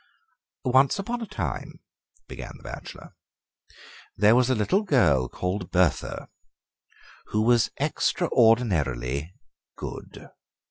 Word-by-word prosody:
"Once 130 Hz, -, +4 dB
upon 235 Hz, +5 st, -3 dB
a 225 Hz, -, -5 dB
time," 75 Hz, -, -5 dB, 0.5 s
began -, -, -8 dB
the -, -, -20 dB
bachelor, -, -, -9 dB, 1.0 s
"there 105 Hz, +3 st, +5 dB
was 125 Hz, 0 st, +3 dB
a 130 Hz, -, +3 dB
little 115 Hz, -, +1 dB
girl 95 Hz, -, +3 dB
called 90 Hz, +4 st, -3 dB
Bertha, 90 Hz, -3 st, 0 dB, 1.0 s
who 105 Hz, 0 st, 0 dB
was 120 Hz, 0 st, +3 dB
extraordinarily 80 Hz, -, +1 dB, 0.5 s
good." -, -, -8 dB
110 Hz, 100 wpm, -25 LUFS, 80-130 Hz, 1.0 s, there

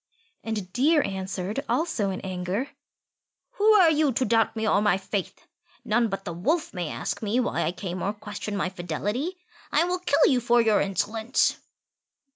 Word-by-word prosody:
And 210 Hz, -5 st, -4 dB
Deer 295 Hz, +4 st, +3 dB
answered, 190 Hz, +5 st, -3 dB
also 275 Hz, -, 0 dB
in 190 Hz, -, -4 dB
anger, 185 Hz, +8 st, -3 dB, 0.9 s
"Who 430 Hz, +1 st, +6 dB
are 365 Hz, -6 st, +6 dB
you 300 Hz, -2 st, +2 dB
to 255 Hz, -, +1 dB
doubt 225 Hz, 0 st, +2 dB
me 220 Hz, 0 st, -1 dB
or 200 Hz, -, +3 dB
my 210 Hz, -3 st, +3 dB
faith? 195 Hz, 0 st, -5 dB, 0.4 s
None 235 Hz, +2 st, +2 dB
but 195 Hz, -2 st, -5 dB
the 170 Hz, -, -4 dB
Wolf 300 Hz, -, -1 dB
may 175 Hz, -4 st, -3 dB
ask -, -, -4 dB
me 220 Hz, +3 st, 0 dB
why 250 Hz, -, 0 dB
I 160 Hz, -, 0 dB
came 180 Hz, -1 st, -5 dB
or 200 Hz, -, 0 dB
question 210 Hz, 0 st, -6 dB
my 190 Hz, -, 0 dB
fidelity. 205 Hz, -, -3 dB, 0.3 s
I -, -, +4 dB
will 360 Hz, +1 st, -1 dB
kill 360 Hz, -5 st, +3 dB
you 255 Hz, -, +4 dB
for 240 Hz, 0 st, +3 dB
your 220 Hz, -2 st, +3 dB
insolence." 220 Hz, +5 st, 0 dB
215 Hz, 175 wpm, -26 LUFS, 190-260 Hz, 0.9 s, Who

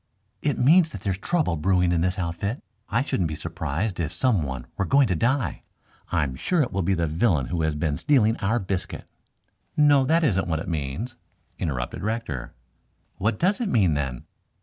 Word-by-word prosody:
"It 145 Hz, -2 st, 0 dB
means 160 Hz, +6 st, +5 dB
that 100 Hz, -, -8 dB
there's 95 Hz, -1 st, -2 dB
trouble 155 Hz, -, 0 dB
brewing 90 Hz, +2 st, +2 dB
in 85 Hz, -2 st, +2 dB
this 90 Hz, +2 st, 0 dB
outfit. 95 Hz, -, -3 dB, 0.3 s
I 115 Hz, +6 st, +1 dB
shouldn't 95 Hz, -, 0 dB
be 80 Hz, -, -4 dB
surprised 80 Hz, +4 st, -3 dB
if 80 Hz, -4 st, -1 dB
some 100 Hz, +3 st, +2 dB
one 65 Hz, -4 st, -4 dB
were -, -, 0 dB
going 140 Hz, +6 st, +4 dB
to 90 Hz, -, +1 dB
die. 125 Hz, -, 0 dB, 0.5 s
I'm 65 Hz, -3 st, 0 dB
sure 155 Hz, -, +1 dB
it 125 Hz, -, -4 dB
will 95 Hz, -, -1 dB
be 95 Hz, +2 st, +1 dB
the 85 Hz, -1 st, 0 dB
villain 80 Hz, -, +1 dB
who 85 Hz, -2 st, -1 dB
has 80 Hz, -1 st, 0 dB
been 75 Hz, -1 st, -1 dB
stealing 115 Hz, -7 st, +3 dB
our 110 Hz, +5 st, +1 dB
biscuit." 95 Hz, -4 st, -4 dB, 0.7 s
"No, 145 Hz, -2 st, +5 dB
that 165 Hz, +4 st, +3 dB
isn't 95 Hz, -, +2 dB
what 80 Hz, -2 st, 0 dB
it 80 Hz, -, -5 dB
means," 85 Hz, -, -3 dB, 0.4 s
interrupted 65 Hz, -6 st, -3 dB
Rector. 110 Hz, -, -3 dB, 0.6 s
"What 110 Hz, +4 st, 0 dB
does 200 Hz, +7 st, +1 dB
it 225 Hz, -, 0 dB
mean, 95 Hz, -, +3 dB
then?" 70 Hz, -4 st, -3 dB
95 Hz, 190 wpm, -25 LUFS, 80-125 Hz, 0.7 s, means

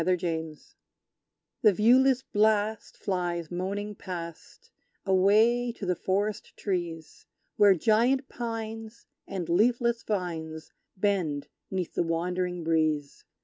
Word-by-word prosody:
The 185 Hz, +1 st, +2 dB
Curlew 160 Hz, -2 st, -3 dB
Song -, -, -25 dB, 0.9 s
The 215 Hz, -3 st, +6 dB
viewless 255 Hz, +5 st, +4 dB
blast 215 Hz, -1 st, +1 dB
flies 175 Hz, -3 st, -2 dB
moaning 200 Hz, +4 st, -3 dB
past, 180 Hz, -, -8 dB, 0.3 s
Away 215 Hz, +6 st, +4 dB
to 215 Hz, -, -7 dB
the 180 Hz, -1 st, +1 dB
forest 200 Hz, +4 st, -2 dB
trees, 170 Hz, -5 st, -4 dB, 0.3 s
Where 205 Hz, -2 st, +6 dB
giant 235 Hz, -, +2 dB
pines 225 Hz, -2 st, -6 dB, 0.2 s
and 180 Hz, -4 st, -4 dB
leafless 235 Hz, +6 st, +2 dB
vines 160 Hz, -6 st, -4 dB, 0.3 s
Bend 170 Hz, -8 st, 0 dB, 0.2 s
'neath 185 Hz, -3 st, -3 dB
the -, -, 0 dB
wandering 180 Hz, +1 st, -1 dB
breeze! 155 Hz, -3 st, 0 dB
190 Hz, 110 wpm, -28 LUFS, 170-220 Hz, 0.9 s, The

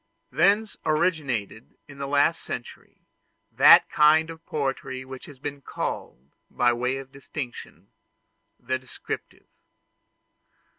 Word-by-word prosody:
Thence 210 Hz, +2 st, +2 dB
originated 150 Hz, -, -1 dB
in 140 Hz, -2 st, -13 dB
the 140 Hz, -, -3 dB
last 140 Hz, +1 st, +2 dB
century, -, -, -9 dB, 0.5 s
that -, -, +7 dB
kind 155 Hz, +2 st, +5 dB
of 165 Hz, 0 st, -12 dB
poetry 135 Hz, -3 st, -3 dB
which 130 Hz, -1 st, -10 dB
has 145 Hz, -, -12 dB
been 145 Hz, +1 st, -6 dB
called, 65 Hz, -, -5 dB, 0.2 s
by 120 Hz, 0 st, +2 dB
way 125 Hz, +2 st, -1 dB
of 135 Hz, -1 st, -9 dB
distinction, 135 Hz, -2 st, -8 dB, 0.7 s
the 130 Hz, +1 st, -2 dB
descriptive. 130 Hz, 0 st, -8 dB
140 Hz, 110 wpm, -25 LUFS, 130-155 Hz, 0.7 s, that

